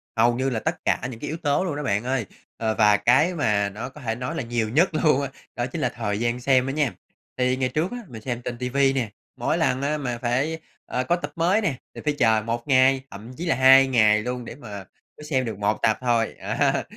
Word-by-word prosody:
hầu 120 +1 +3
như 130 +2 0
là 115 -3 -2
tất - - -1
cả - - +1
những 115 - -9
cái 145 - -5
yếu 160 - -3
tố 150 +1 +1
luôn 170 -6 -2
đó 150 - -4
bạn 105 -3 0
ơi, 125 -2 -1 0.3
ờ, 110 -1 -1
và 105 -1 +5
cái 135 - +3
mà 105 -8 +1
nó 110 +6 -6
có 150 - -14
thể 115 -3 -2
nói 125 +1 -4
là - - -2
nhiều 115 -2 -1
nhất 160 - +3
luôn 155 -3 +3
á, 140 - -3 0.3
đó 120 - -1
chính 145 +5 -5
là 125 - +1
thời 105 -4 -3
gian 120 +1 -1
xem 130 0 +3
đó - - -1
nha. 145 -4 0 0.4
Thì 125 0 +1
ngày 130 -1 0
trước 155 - -1
á 245 - -5
mình 115 -6 -10
xem 120 0 -4
trên 120 0 -5
ti 125 0 -3
vi 135 +1 +3
nè, 125 -6 -1 0.3
mỗi - - 0
lần 130 +1 +1
á 150 +2 0
mà 125 -5 -3
phải, 135 +7 -1 0.3
ờ, 125 - -2
có 170 - +1
tập 150 -4 -6
mới 180 +6 +2
nè, 170 -10 0 0.2
thì - - -7
phải 150 - +2
chờ 110 -2 +4
1 115 +2 -3
ngày, 130 -1 +4
thậm 105 +5 -10
chí 175 - -4
là 165 - +2
2 135 +1 +7
ngày 110 -4 +4
luôn 125 0 -4
để - - -8
mà 105 -8 -8 0.3
mới - - -11
xem 130 -4 0
được 110 -4 -5
1 105 +1 +1
tập 110 - +3
thôi, 120 -3 +1
á. - - 0
125 Hz, 260 wpm, -24 LUFS, 115-140 Hz, 0.4 s, 2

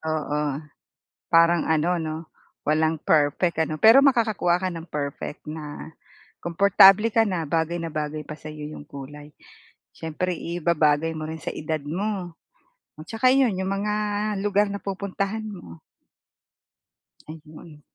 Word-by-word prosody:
Oo. 150 -1 -2 0.9
Parang 170 0 +5
ano, 160 +2 +2
'no, 155 -1 -3 0.5
walang 155 +2 +2
perfect 155 +3 +2
ano, 155 0 -3
pero 225 +4 +8
makakakuha 220 -9 +2
ka 185 - 0
ng 165 -1 -7
perfect 145 0 -5
na 155 0 -8 0.5
komportable 195 +4 +6
ka 225 +1 +3
na 180 -5 -1
bagay 165 +2 -1
na 165 - -4
bagay 150 0 -4
pa 150 - -7
sa'yo 150 -1 -8
'yong 150 -1 -10
kulay. 145 +2 -10 0.6
Siyempre 160 +3 -3
ibabagay 165 -2 +1
mo 155 0 -5
rin 160 0 -6
sa - - -3
edad 155 0 -3
mo. 180 +3 -3 0.6
At 155 - -10
saka 230 +3 +2
'yon, 255 -8 +3
'yong 190 - -2
mga 205 +2 -1 0.5
lugar 205 0 +2
na 200 - -5
pupuntahan 200 +2 -3
mo. 130 - -10 1.5
Ayun. 155 0 -12
165 Hz, 135 wpm, -24 LUFS, 155-195 Hz, 1.5 s, pero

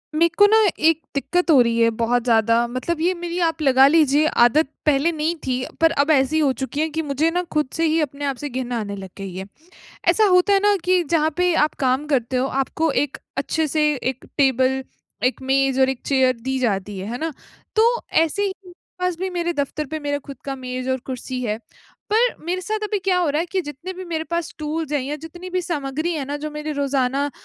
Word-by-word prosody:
मेरे 335 +2 +4
को 410 - +8
ना, 435 +2 +5 0.2
एक 320 0 +3
दिक्कत 335 +5 +1
हो 285 - +7
रही 235 -1 +1
है 230 - +5
बहुत 240 +1 +1
ज़्यादा 230 0 +3
मतलब 255 +7 -3
ये 355 +3 +2
मेरी 345 0 -4
आप 325 -1 -4
लगा 265 -2 +6
लीजिए 300 -1 +4 0.2
आदत 300 +6 +3 0.2
पहले 300 +2 +3
नहीं 315 +1 -1
थी, 255 -1 -1 0.2
पर 325 0 +5
अब 290 -1 +2
ऐसी 285 +2 +3
हो 290 -3 +3
चुकी 265 +2 -3
है 320 - 0
कि 320 +1 -2
मुझे 295 +1 0
ना 355 +1 0
खुद 300 -3 +1
से 330 - 0
ही 320 +1 +2
अपने 285 -1 -3
आप 275 -1 -1
से 290 +4 -6
घिन 255 -1 -4
आने 210 -4 -3
लग 195 -1 -8
गई 195 -2 -7
है। 190 +1 -5 0.6
ऐसा 400 +5 +5
होता 365 +1 +4
है 395 - +4
ना, 410 0 +4
कि 365 0 +3
जहाँ 315 0 +1
पे 360 0 +2
आप 300 -1 +2
काम 260 +2 +1
करते 260 -4 0
हो, 255 - +1
आपको 270 +4 -1
एक 280 0 -1 0.2
अच्छे 315 +3 0
से 305 +1 +1
1 260 0 -4
टेबल, 265 -1 +2 0.4
1 255 +1 0
मेज 270 0 +1
और 265 - +5
1 265 - -5
चेयर 260 -2 +3
दी 265 +2 -2
जाती 205 -5 -1
है, 190 - -5
है 245 - -4
ना? 320 +2 -3 0.4
तो 435 - +5 0.3
ऐसे 325 +5 +2
ही, 400 -1 0
मेरे 360 -1 -14 0.3
पास 365 -1 0
भी 375 +1 -2
मेरे 345 -1 -1
दफ्तर 295 0 -3
पर 315 +3 -5
मेरा 285 -1 -1
खुद 275 - -8
का 275 -1 -4
मेज 255 0 -5
और 260 0 +1
कुर्सी 255 0 -5
है। 215 -2 -2 0.5
पर 470 +3 +3
मेरे 360 +2 -2
साथ 430 +3 -2
अभी 420 0 -1
क्या 375 -1 +1
हो 350 -3 +1
रहा 300 +2 0
है, 340 - -2
कि 375 +2 -1
जितने 295 +3 -7
भी 370 0 -8
मेरे 325 -2 -3
पास 340 -1 -2
टूल्स 310 0 -3
हैं, 295 - +1
या 280 +3 -4
जितनी 345 +4 -10
भी 365 0 0
सामग्री 310 0 -2
है 295 -3 -2
ना, 285 +2 -4
जो 305 +1 -5
मेरे 300 +1 -4
रोज़ाना 280 0 0
295 Hz, 235 wpm, -22 LUFS, 260-330 Hz, 0.6 s, को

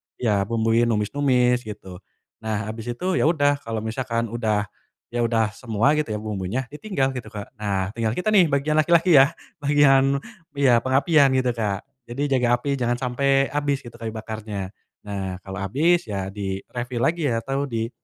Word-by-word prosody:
ya 105 -5 +1
bumbuin 115 +1 +2
numis-numis 125 +2 +2
gitu, 100 -4 -8 0.4
nah 110 -1 -2
abis 115 +2 -5
itu 185 +4 -1
ya - - +3
udah 145 -3 +2
kalo 115 -1 -3
misalkan 115 0 -2
udah 110 -3 0 0.5
ya 120 - 0
udah 115 -2 +1
semua 115 +2 +1
gitu 150 -5 -1
ya - - -2
bumbunya 105 +4 -3
ditinggal 150 -5 -1
gitu 120 - -7
Kak 105 -1 -7
nah 100 -3 -1
tinggal 110 -1 0
kita 180 +4 0
nih 190 -4 +7
bagian 140 +2 +1
laki-laki 170 +3 +4
ya, 135 +1 +6 0.3
bagian 140 -1 +4 0.4
iya 130 -4 +5
pengapian 135 +1 +4
gitu 130 -1 +1
Kak 105 -3 -1 0.3
jadi 120 +4 -4 0.2
jaga 125 -1 +1
api 140 +1 -1
jangan 120 -1 0
sampe 135 +2 +2
abis 145 -1 -1
gitu 115 -1 -12
kayu 115 -2 -5
bakarnya, 110 -3 -5 0.3
nah 95 -3 -5
kalo 95 0 -8
abis 165 - +2
ya 95 -2 -4
di-refill 105 +5 -5
lagi 165 +3 +1
ya 115 -4 0
atau 135 +4 -2
di 115 -4 -3
120 Hz, 170 wpm, -23 LUFS, 110-140 Hz, 0.5 s, nih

